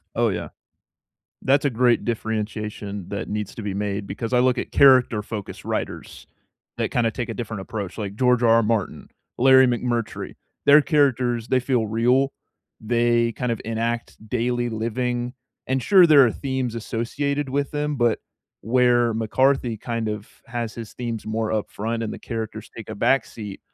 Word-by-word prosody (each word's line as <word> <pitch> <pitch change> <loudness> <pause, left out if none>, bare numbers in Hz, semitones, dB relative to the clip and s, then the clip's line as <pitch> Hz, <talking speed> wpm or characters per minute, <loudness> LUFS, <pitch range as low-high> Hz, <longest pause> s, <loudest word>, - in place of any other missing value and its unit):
Oh, 115 0 +2
yeah. 95 - -4 0.9
That's 140 +2 +3
a 145 - +3
great 120 0 +2
differentiation 105 -3 -4
that 100 +2 -4
needs 105 -1 -4
to 115 - -7
be 100 -2 -3
made, 100 0 -2
because 105 +5 -5
I 125 - +4
look 125 0 +2
at - - -4
character 130 -6 +5
focused 105 -2 -7
writers - - -5 0.5
that - - -1
kinda 115 -2 +1
take 120 +1 -4
a 115 - -4
different 110 -4 -5
approach, 100 -2 -6
like 100 -2 -4
George 125 0 +3
R. 115 -1 +5
R. 115 - +4
Martin, 110 -3 -2 0.3
Larry 130 +1 +7
McMurtry. 120 -1 -2 0.3
Their 145 +1 +8
characters; 125 -6 +1
they 130 -1 +3
feel 125 -3 0
real, 125 +5 +2 0.5
they 120 +1 +2
kind 125 +1 -3
of 115 - -4
enact 115 +1 -2
daily 120 +1 0
living 120 +2 -2 0.3
and 130 0 0
sure, 190 +3 +6
there 145 -4 +7
are 115 - 0
themes 130 -4 -3
associated 140 +6 -2
with 140 +1 -1
them, 150 0 -2
but 120 -3 +2 0.4
where 120 0 +3
McCarthy 120 +2 +1
kind 115 0 -3
of 105 -1 -4 0.2
has 115 -2 -4
his 115 -2 -8
themes 115 -3 -4
more 110 0 -1
upfront, 110 +2 -2
and 110 - -3
the - - -7
characters 110 -2 -6
take 110 - -8
a - - -4
backseat, 105 -4 -1
115 Hz, 165 wpm, -23 LUFS, 110-125 Hz, 0.9 s, Their